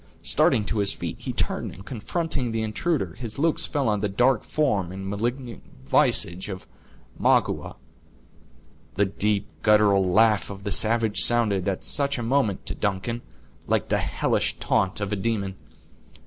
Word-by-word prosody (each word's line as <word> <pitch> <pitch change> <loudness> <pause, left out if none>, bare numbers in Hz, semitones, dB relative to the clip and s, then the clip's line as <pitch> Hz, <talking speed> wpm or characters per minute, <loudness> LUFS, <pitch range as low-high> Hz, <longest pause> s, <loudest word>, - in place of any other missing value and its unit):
Starting 105 - +2
to 110 - -2
his 100 0 +1
feet, - - -5
he - - -5
turned, - - -2
and, 95 - -13
confronting 135 +2 -3
the 110 0 -2
intruder, 110 - -2
his 115 -4 -5
looks 160 +2 0
fell 140 -4 -1
on 105 -1 +1
the 105 0 -1
dark 125 +4 +2
form 105 - 0
and 95 +1 -7
malignant 120 +5 -4 0.2
visage 85 +7 +1
of 95 -2 -7 0.5
Magua. - - +1 1.2
The 100 - +2
deep 100 +1 0 0.2
guttural 105 -2 +4
laugh 110 +1 +3
of 100 -1 -9
the 100 - -3
savage 110 0 +3
sounded, 105 -6 +5
at 95 -2 -2
such 140 -1 +1
a 120 - -4
moment, 115 -5 0
to - - -3
Duncan, 105 +4 -2 0.5
like - - 0
the - - +1
hellish - - -1
taunt 95 +2 0
of 100 0 -2
a - - +1
demon. 100 -2 -2
105 Hz, 160 wpm, -24 LUFS, 100-120 Hz, 1.2 s, sounded